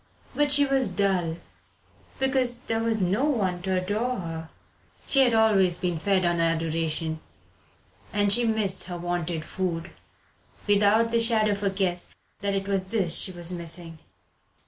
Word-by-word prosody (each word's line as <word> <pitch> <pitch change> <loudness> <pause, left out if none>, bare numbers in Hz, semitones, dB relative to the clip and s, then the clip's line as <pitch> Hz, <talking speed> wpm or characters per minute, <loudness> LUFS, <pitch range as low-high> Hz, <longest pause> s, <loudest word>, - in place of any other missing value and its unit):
But 295 -1 +1
she 285 0 +5
was 270 -2 +1
dull 180 -5 0 0.8
because 260 -2 +1
there 225 -3 -2
was 225 -1 0
no 195 +9 +1
one 195 -11 -1
to 190 0 -1
adore 215 +7 -2
her. 165 -3 -6 0.6
She 275 - +2
had 245 -4 +4
always 195 -6 +3
been 175 -3 -2
fed 190 +1 +1
on 175 0 +1
adoration, 165 -1 -1 0.9
and 205 -1 +3
she 240 - +3
missed 215 -4 +1
her 180 -1 -6
wonted 175 -2 -3
food 175 -1 -4 0.7
without 210 +3 +3
the 230 - +2
shadow 225 -2 +3
of 200 0 -2
a 200 - +1
guess 185 -2 0 0.3
that 200 -1 -1
it 195 0 -3
was 195 -2 0
this 190 -4 +1
she 190 - +1
was 175 -1 -1
missing. 165 -1 -4
195 Hz, 155 wpm, -25 LUFS, 175-225 Hz, 0.9 s, she